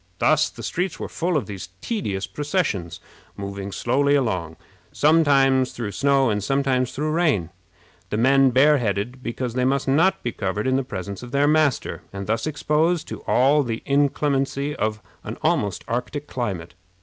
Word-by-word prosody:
Thus 155 Hz, +6 st, +3 dB
the -, -, -11 dB
streets 180 Hz, 0 st, -2 dB
were -, -, -4 dB
full 170 Hz, -1 st, -1 dB
of 145 Hz, -, -2 dB
these 95 Hz, -3 st, -7 dB
tedious 100 Hz, -, -3 dB
processions, 145 Hz, -, -2 dB, 0.4 s
moving 100 Hz, 0 st, -5 dB
slowly 140 Hz, +7 st, +1 dB
along, 90 Hz, -, -1 dB, 0.4 s
sometimes 140 Hz, -4 st, +3 dB
through 115 Hz, -4 st, -4 dB
snow 135 Hz, 0 st, +2 dB
and 105 Hz, -1 st, -1 dB
sometimes 130 Hz, 0 st, +1 dB
through 155 Hz, +2 st, -2 dB
rain, 150 Hz, -, +1 dB, 0.6 s
the 105 Hz, -, -2 dB
men 135 Hz, +3 st, +5 dB
bareheaded, 125 Hz, -3 st, +2 dB
because 120 Hz, 0 st, -4 dB
they 125 Hz, +1 st, 0 dB
must 135 Hz, +2 st, +1 dB
not 160 Hz, +8 st, +3 dB
be 120 Hz, -, -1 dB
covered 105 Hz, 0 st, -3 dB
in 130 Hz, 0 st, +2 dB
the 135 Hz, -, +1 dB
presence 100 Hz, -4 st, -6 dB
of 125 Hz, -, -8 dB
their 140 Hz, +1 st, +2 dB
master, 150 Hz, -3 st, +1 dB
and 100 Hz, 0 st, -6 dB
thus 110 Hz, +6 st, -1 dB
exposed 155 Hz, +2 st, 0 dB
to -, -, -6 dB
all 140 Hz, +4 st, +4 dB
the 115 Hz, -4 st, -4 dB
inclemency 140 Hz, 0 st, 0 dB
of 110 Hz, 0 st, -2 dB, 0.2 s
an 110 Hz, -, -6 dB
almost 140 Hz, -, 0 dB
Arctic 140 Hz, +5 st, -3 dB
climate. 95 Hz, -, -4 dB
130 Hz, 160 wpm, -23 LUFS, 105-145 Hz, 0.6 s, men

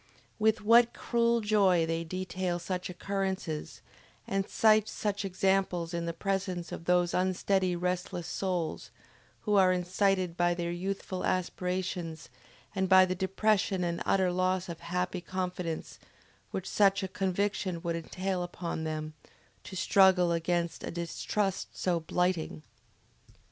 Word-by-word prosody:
With 220 Hz, +1 st, +3 dB
what 230 Hz, +2 st, +5 dB
cruel 235 Hz, -1 st, +1 dB
joy 195 Hz, -5 st, +3 dB
they 165 Hz, 0 st, -1 dB
detail 185 Hz, +1 st, -3 dB
such 180 Hz, +1 st, -4 dB
occurrences, 190 Hz, -4 st, -3 dB, 0.5 s
and 195 Hz, 0 st, -1 dB
cite 215 Hz, -1 st, +4 dB
such 205 Hz, -1 st, -2 dB
examples 190 Hz, -2 st, 0 dB
in 170 Hz, 0 st, -2 dB
the -, -, 0 dB
presence 185 Hz, -1 st, -2 dB
of 165 Hz, -, -7 dB
those 180 Hz, 0 st, +2 dB
unsteady 185 Hz, 0 st, +1 dB
restless 180 Hz, -1 st, -2 dB
souls, 180 Hz, -4 st, -2 dB, 0.5 s
who 210 Hz, -, -1 dB
are 185 Hz, -1 st, +6 dB
incited 185 Hz, 0 st, +1 dB
by 175 Hz, 0 st, +2 dB
their 170 Hz, -1 st, -2 dB
youthful 185 Hz, +1 st, -4 dB
aspirations 180 Hz, -2 st, -2 dB, 0.4 s
and 190 Hz, -2 st, 0 dB
by 185 Hz, -1 st, +8 dB
the 185 Hz, -, -1 dB
depression 190 Hz, 0 st, +1 dB
and 170 Hz, -1 st, -2 dB
utter 190 Hz, -2 st, +2 dB
loss 185 Hz, 0 st, 0 dB
of 170 Hz, -, -6 dB
happy 180 Hz, +1 st, -2 dB
confidence 180 Hz, -2 st, -4 dB, 0.5 s
which 190 Hz, -, -4 dB
such 200 Hz, -1 st, +3 dB
a -, -, -1 dB
conviction 190 Hz, -2 st, -1 dB
would 170 Hz, -1 st, -1 dB
entail 185 Hz, +3 st, -3 dB
upon 175 Hz, -2 st, -4 dB
them, 155 Hz, 0 st, -4 dB, 0.5 s
to 190 Hz, -, -8 dB
struggle 185 Hz, -1 st, +4 dB
against 170 Hz, 0 st, -1 dB
a -, -, -4 dB
distrust 180 Hz, +3 st, -2 dB
so 175 Hz, -2 st, +1 dB
blighting! 170 Hz, -1 st, -1 dB
185 Hz, 135 wpm, -30 LUFS, 175-195 Hz, 0.5 s, by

